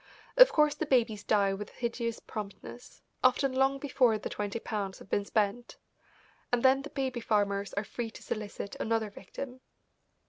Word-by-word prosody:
Of - - +9
course 300 -1 +4
the 305 +1 -3
babies 230 -6 +2
die 200 -2 +3
with 200 +1 -6
hideous 235 -1 -3
promptness, 195 - -9 0.2
often 260 +1 +3
long 270 +1 +3
before 255 -5 +2
the 210 - -5
twenty 205 +1 -3
pounds 200 -4 -4
have - - -15
been 200 - +1
spent, 215 +3 -1 0.7
and 245 -1 +1
then 265 +1 +5
the 295 - -8
baby 265 -4 -2
farmers 200 -3 0
are 200 - 0
free 230 +2 -4
to - - -12
solicit 205 -2 -5
another 225 -2 0
victim. 250 +7 -8
230 Hz, 165 wpm, -30 LUFS, 205-260 Hz, 0.7 s, Of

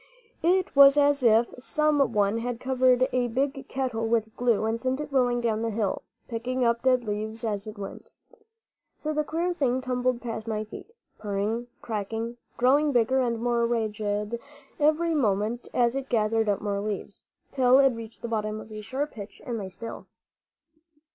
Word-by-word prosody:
It 365 +1 +2
was 280 +1 +8
as 285 -1 +4
if 230 -1 +4
some 290 -1 +2
one 205 +1 +2
had 240 0 -3
covered 255 0 +3
a 250 -1 +2
big 270 +4 -2
kettle 245 -4 -2
with 220 -1 0
glue 235 -3 +2
and 225 +1 -1
sent 260 +3 -1
it 300 -1 -6
rolling 245 -2 +2
down 220 -2 0
the 230 - 0
hill, 210 -3 -1 0.3
picking 250 +2 -1
up 235 0 +2
dead 255 -1 +3
leaves 220 +1 -3
as 210 -1 -2
it 215 - -8
went. 195 -1 -8 0.9
So 310 0 -3
the 305 0 +1
queer 335 +4 -1
thing 260 -6 +1
tumbled 250 -1 -1
past 230 -2 -5
my 215 -1 -1
feet, 215 - -10 0.3
purring, 210 +3 -2 0.2
crackling, 225 +2 -3 0.2
growing 285 +5 +4
bigger 250 +1 +3
and 235 -2 0
more 235 0 +1
ragged 215 -1 -2 0.4
every 310 +3 +3
moment 225 -3 0
as 240 0 +2
it 275 0 -4
gathered 225 -1 +1
up 200 -1 0
more 205 -1 -1
leaves, 205 -1 -5 0.3
till 255 -1 +5
it 270 0 +6
reached 230 -2 -8
the - - -2
bottom 215 -1 -2
of 215 - -11
a 215 0 -6
sharp 265 +7 -3
pitch 205 -3 -10
and 235 -2 -3
lay 195 -2 -5
still. 230 +5 -8
235 Hz, 175 wpm, -27 LUFS, 220-260 Hz, 0.9 s, was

